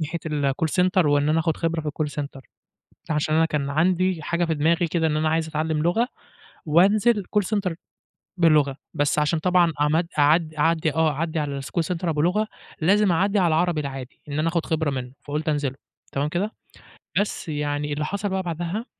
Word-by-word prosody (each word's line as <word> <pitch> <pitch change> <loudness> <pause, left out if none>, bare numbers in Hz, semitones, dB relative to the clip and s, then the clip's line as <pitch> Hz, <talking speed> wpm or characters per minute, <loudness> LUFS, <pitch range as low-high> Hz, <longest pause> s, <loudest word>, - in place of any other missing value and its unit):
ناحية 165 +2 -3
الcall 145 0 0 0.2
center، 185 -2 +3
وإن 145 0 +3
أنا 160 +1 +3
آخد 160 -1 0
خِبرة 165 -1 -1
في 150 - -4
الcall 150 0 -3
center 140 -1 -9 0.7
ده 160 - 0
عشان 155 +1 0
أنا 160 0 +4
كان 145 -3 -2
عندي 180 +2 +1
حاجة 170 +3 0
في 160 -1 0
دماغي 165 +3 +2
كده 165 0 +1
إن 150 -1 0
أنا 155 0 +1
عايز 160 0 +1
أتعلم 155 0 -1
لُغة 220 +9 +2 0.6
وأنزل 205 +6 +4
call 205 - +5
center 185 -4 -1 0.6
باللغة، 150 -5 +3 0.2
بس 145 +1 +1
عشان 150 +2 +2
طبعًا 175 -1 +3
عمد 155 +3 +2
أعد 155 +2 +3
أعدّي 160 0 +1
آه 160 -1 +3
أعدّي 160 +2 -2
على 140 -2 -2
الschool 170 +5 -1
center 175 - -7
أبو 150 -2 0
لُغة 210 +6 +2 0.3
لازم 195 +3 +4
أعّدي 195 +5 +2
على 175 -3 +3
العربي 165 0 +1
العادي، 135 -2 -7
إن 145 +1 -3
أنا 160 +2 +1
آخد 170 -1 -1
خِبرة 160 -2 0
مِنّه 130 -2 -5
فقُلت 150 +2 -3
أنزله، 145 -3 0 0.4
تمام 140 +2 0
كده؟ 190 +7 -2 0.7
بس 205 -4 -2
يعني 145 0 -2
اللي 150 +1 -2
حصل 200 +3 -2
بقى 190 0 -1
بعدها، 175 +6 -3
160 Hz, 195 wpm, -24 LUFS, 150-175 Hz, 0.7 s, call